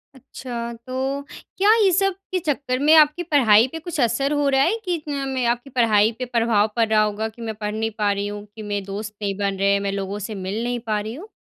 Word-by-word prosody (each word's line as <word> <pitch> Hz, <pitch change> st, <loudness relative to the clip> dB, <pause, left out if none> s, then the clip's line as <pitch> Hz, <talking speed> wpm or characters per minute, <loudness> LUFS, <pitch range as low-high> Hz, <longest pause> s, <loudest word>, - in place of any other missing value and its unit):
अच्छा, 240 Hz, -2 st, -7 dB
तो 260 Hz, +4 st, -4 dB, 0.4 s
क्या 410 Hz, +3 st, +5 dB
ये 385 Hz, -, +4 dB
सब 390 Hz, +2 st, +2 dB, 0.2 s
के 370 Hz, -, 0 dB
चक्कर 280 Hz, -5 st, -2 dB
में 300 Hz, +3 st, +4 dB
आपकी 305 Hz, +2 st, +5 dB
पढ़ाई 245 Hz, -8 st, +5 dB
पर 325 Hz, -, -4 dB
कुछ 335 Hz, -3 st, -4 dB
असर 275 Hz, +4 st, +1 dB
हो 290 Hz, -1 st, +1 dB
रहा 270 Hz, -1 st, +3 dB
है? 355 Hz, +11 st, +2 dB
कि 350 Hz, -3 st, -1 dB
मैं 270 Hz, -3 st, -2 dB
आपकी 240 Hz, +3 st, -1 dB
पढ़ाई 225 Hz, -4 st, +3 dB
पे 255 Hz, -, -2 dB
प्रभाव 230 Hz, -3 st, +2 dB
पड़ 230 Hz, -1 st, +2 dB
रहा 215 Hz, -1 st, +4 dB
होगा 215 Hz, +1 st, -1 dB
कि 225 Hz, +2 st, -15 dB
मैं 220 Hz, -1 st, -4 dB
पढ़ 210 Hz, 0 st, -4 dB
नहीं 225 Hz, +1 st, -1 dB
पा 205 Hz, -2 st, +2 dB
रही 200 Hz, 0 st, -2 dB
हूँ, 205 Hz, 0 st, -7 dB
कि 220 Hz, -, -8 dB
मेरे 205 Hz, -1 st, -3 dB
दोस्त 205 Hz, +2 st, -6 dB
नहीं 200 Hz, -1 st, -1 dB
बन 200 Hz, -1 st, -1 dB
रहे 200 Hz, 0 st, +3 dB
हैं, 200 Hz, -, +2 dB
मैं 200 Hz, 0 st, -2 dB
लोगों 195 Hz, +1 st, -4 dB
से 215 Hz, -, -5 dB
मिल 210 Hz, +4 st, -2 dB
नहीं 245 Hz, 0 st, -2 dB
पा 215 Hz, -1 st, +1 dB
रही 215 Hz, +2 st, -5 dB
हूँ? 335 Hz, -, -9 dB
235 Hz, 245 wpm, -22 LUFS, 210-275 Hz, 0.4 s, क्या